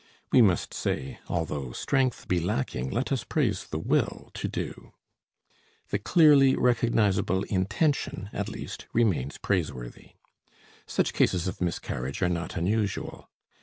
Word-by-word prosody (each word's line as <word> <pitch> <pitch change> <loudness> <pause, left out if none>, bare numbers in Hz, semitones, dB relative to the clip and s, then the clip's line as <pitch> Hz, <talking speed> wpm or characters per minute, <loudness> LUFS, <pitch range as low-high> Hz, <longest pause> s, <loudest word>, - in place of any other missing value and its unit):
We 130 - +7
must 95 -6 +2
say: 65 +1 -3
"Although 75 -7 -2
strength 130 - 0
be 90 - +2
lacking, 90 - -2
let 125 - -2
us 130 -5 0
praise 115 -11 0
the 80 - -4
will 80 - -1
to - - -3
do." - - -6 1.0
The 100 - 0
clearly 140 - +6
recognizable 105 -6 +2
intention, 100 - -1
at - - -2
least, - - -7
remains 95 - +1
praiseworthy. 70 -11 -3 0.7
Such - - 0
cases 90 -1 +2
of 90 - -5
miscarriage 70 -4 -2
are 90 - +3
not 85 +1 -3
unusual. 100 +3 -2
95 Hz, 130 wpm, -27 LUFS, 85-120 Hz, 1.0 s, We